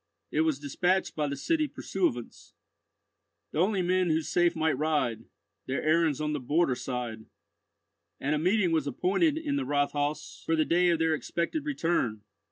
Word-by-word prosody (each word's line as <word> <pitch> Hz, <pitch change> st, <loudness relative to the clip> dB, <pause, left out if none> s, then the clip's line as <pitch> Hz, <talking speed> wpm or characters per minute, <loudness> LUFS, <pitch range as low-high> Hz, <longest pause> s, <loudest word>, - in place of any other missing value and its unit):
It 155 Hz, -, +2 dB
was 160 Hz, -3 st, +1 dB
despatched 175 Hz, +7 st, 0 dB
by 150 Hz, -1 st, 0 dB
the 140 Hz, -, -3 dB
city 310 Hz, -, 0 dB
pursuivants— 175 Hz, -, -3 dB, 1.0 s
The -, -, -2 dB
only 190 Hz, +1 st, +2 dB
men 185 Hz, 0 st, +2 dB
who 160 Hz, 0 st, +1 dB
safe 175 Hz, +2 st, +2 dB
might 160 Hz, -2 st, +1 dB
ride; 140 Hz, -6 st, 0 dB, 0.4 s
Their 130 Hz, -, -2 dB
errands 155 Hz, -2 st, +2 dB
on 150 Hz, 0 st, -1 dB
the 150 Hz, -, -1 dB
border 145 Hz, +3 st, +2 dB
side; 120 Hz, -3 st, -5 dB, 0.9 s
and 145 Hz, +2 st, 0 dB
a 150 Hz, -, +1 dB
meeting 185 Hz, +2 st, +2 dB
was 160 Hz, -3 st, +1 dB
appointed 200 Hz, -, +1 dB
in 295 Hz, -3 st, -1 dB
the 280 Hz, -, 0 dB
Rathhaus 145 Hz, -, -1 dB
for 165 Hz, -, +1 dB
the 155 Hz, -1 st, +2 dB
day 175 Hz, +1 st, +3 dB
of 170 Hz, -, +3 dB
their 160 Hz, 0 st, +2 dB
expected 170 Hz, -, -2 dB
return. 165 Hz, -, -1 dB
160 Hz, 170 wpm, -28 LUFS, 145-180 Hz, 1.0 s, day